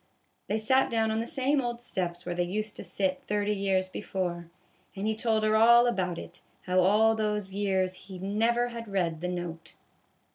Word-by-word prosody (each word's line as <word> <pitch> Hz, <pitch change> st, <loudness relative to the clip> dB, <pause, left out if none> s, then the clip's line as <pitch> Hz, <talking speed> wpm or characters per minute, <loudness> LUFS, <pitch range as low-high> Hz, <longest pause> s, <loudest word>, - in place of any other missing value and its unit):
They 210 Hz, -, 0 dB
sat 260 Hz, +5 st, +2 dB
down 225 Hz, -1 st, +1 dB
on 220 Hz, -, 0 dB
the 230 Hz, -, -3 dB
same 280 Hz, -1 st, +1 dB
old 240 Hz, -1 st, -3 dB
steps 180 Hz, -6 st, -3 dB
where 175 Hz, -, -2 dB
they 175 Hz, -, -1 dB
used 210 Hz, +4 st, -2 dB
to -, -, -6 dB
sit 190 Hz, -2 st, -1 dB
thirty 210 Hz, 0 st, 0 dB
years 195 Hz, -2 st, 0 dB
before, 180 Hz, -3 st, -4 dB, 0.5 s
and 195 Hz, +1 st, -4 dB
he 220 Hz, -, +1 dB
told 220 Hz, -1 st, +1 dB
her 215 Hz, 0 st, +3 dB
all 235 Hz, +2 st, +7 dB
about 185 Hz, -7 st, 0 dB
it, -, -, -10 dB, 0.2 s
how 185 Hz, 0 st, +1 dB
all 210 Hz, +4 st, +4 dB
those 210 Hz, -3 st, -2 dB
years 190 Hz, -2 st, 0 dB, 0.2 s
he 190 Hz, -, -7 dB
never 225 Hz, +6 st, +1 dB
had 230 Hz, -1 st, -7 dB
read 175 Hz, -5 st, -1 dB
the 180 Hz, -, -2 dB
note. 175 Hz, -2 st, -6 dB
205 Hz, 190 wpm, -28 LUFS, 185-225 Hz, 0.5 s, all